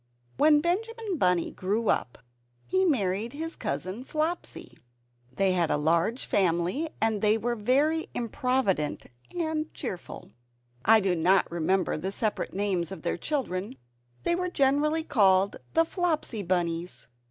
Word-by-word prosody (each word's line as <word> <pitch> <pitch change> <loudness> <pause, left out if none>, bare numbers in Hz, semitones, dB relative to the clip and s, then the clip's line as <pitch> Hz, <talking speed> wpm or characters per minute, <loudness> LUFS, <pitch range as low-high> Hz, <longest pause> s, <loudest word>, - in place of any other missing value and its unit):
When 295 0 +5
Benjamin 420 +2 -2
Bunny 180 -2 +2
grew 210 +4 -2
up, 120 - 0 0.5
he 375 0 +2
married 220 - 0
his 325 +3 -5
Cousin 190 +7 -4
Flopsy. 310 - -3 0.6
They 190 +8 +1
had 175 -3 +1
a 150 - +2
large 170 - +1
family, 185 - +1
and 220 -2 +1
they 215 +1 +4
were 240 +2 -1
very 280 +9 +1
improvident 235 - 0 0.3
and 315 -2 -2
cheerful. 190 -10 -6 0.5
I 220 +1 +6
do 190 -2 +1
not 180 +3 +3
remember 175 +1 0
the 190 +5 -3
separate 215 +1 -1
names 190 -4 -1
of 195 - -8
their 170 - 0
children; 190 - -3 0.5
they - - +2
were 360 +1 -1
generally 300 +1 +2
called 195 - +3 0.2
the 330 0 +5
"Flopsy 320 - -1
Bunnies." 175 -1 -2
215 Hz, 135 wpm, -27 LUFS, 185-305 Hz, 0.6 s, I